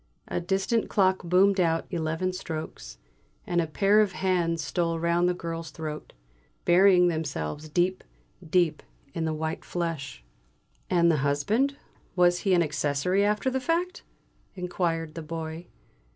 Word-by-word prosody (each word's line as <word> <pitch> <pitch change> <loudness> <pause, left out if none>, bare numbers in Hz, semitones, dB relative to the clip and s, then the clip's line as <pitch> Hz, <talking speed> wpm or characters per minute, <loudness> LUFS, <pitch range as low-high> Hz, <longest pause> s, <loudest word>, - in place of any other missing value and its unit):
A - - -2
distant 195 +5 0
clock 190 -2 +2
boomed 190 +3 +3
out 165 -2 +1
eleven 165 +2 -1
strokes, 155 - -6 0.5
and 175 -1 +1
a 165 - -2
pair 200 +6 +4
of 205 -3 0
hands 175 -4 0
stole 165 +3 -1
round 170 +2 +2
the 180 - 0
girl's 165 -1 -5
throat, 155 -1 -7 0.5
burying 180 0 +6
themselves 150 - -3
deep, 180 +4 0 0.4
deep 170 -1 +1 0.3
in 165 - -2
the 160 - 0
white 160 +1 -3
flesh. 165 - -4 0.7
"And 170 -2 +4
the 155 - +2
husband, 150 - +1 0.4
was 175 -1 +4
he 195 -2 +2
an 175 - +4
accessory 150 +5 0
after 210 +5 +1
the 265 0 -1
fact?" 345 +6 -1 0.5
inquired 170 -3 -2
the 165 - -6
Boy. 160 +1 -6
170 Hz, 140 wpm, -27 LUFS, 160-185 Hz, 0.7 s, burying